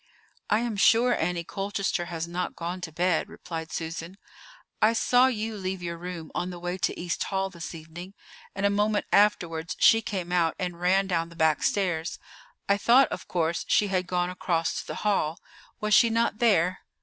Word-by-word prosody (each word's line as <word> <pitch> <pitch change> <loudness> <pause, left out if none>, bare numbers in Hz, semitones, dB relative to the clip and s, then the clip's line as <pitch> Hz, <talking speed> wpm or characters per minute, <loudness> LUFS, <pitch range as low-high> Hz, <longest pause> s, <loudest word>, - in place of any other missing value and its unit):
"I 215 - +3
am 235 -3 -3
sure 235 +4 +4
Annie 170 +1 -1
Colchester 195 -1 -2
has 170 -1 -4
not 180 +1 -3
gone 175 +2 -5
to 170 -2 -6
bed," 175 +1 0
replied 165 -2 -7
Susan. 165 +3 -5 0.6
"I 215 +2 +5
saw 245 +2 +4
you 220 -3 -2
leave 190 -2 -4
your 170 -1 -3
room 170 -2 -7
on 180 - -2
the 180 - -7
way 175 +1 -4
to - - -1
East 175 -1 -2
Hall 195 -1 -2
this 170 -1 -7
evening, 170 +4 -10 0.4
and 200 - -1
a 200 - +3
moment 210 +1 +1
afterwards 170 -5 +2
she 225 - +6
came 185 -5 -4
out 170 -3 +2
and 180 -2 -4
ran 190 +2 +3
down 170 -3 -1
the 170 - -14
back 160 -2 +2
stairs. 175 -5 0 0.5
I 200 - +3
thought, 255 +5 +5
of - - -6
course, 165 -1 -1
she 205 - +3
had 185 -1 0
gone 180 0 0
across 170 -2 -1
to - - -15
the - - -5
hall. 165 -6 +1 0.4
Was 210 0 0
she 230 - +6
not 230 -1 0
there?" 185 -6 +3
180 Hz, 190 wpm, -27 LUFS, 170-205 Hz, 0.6 s, she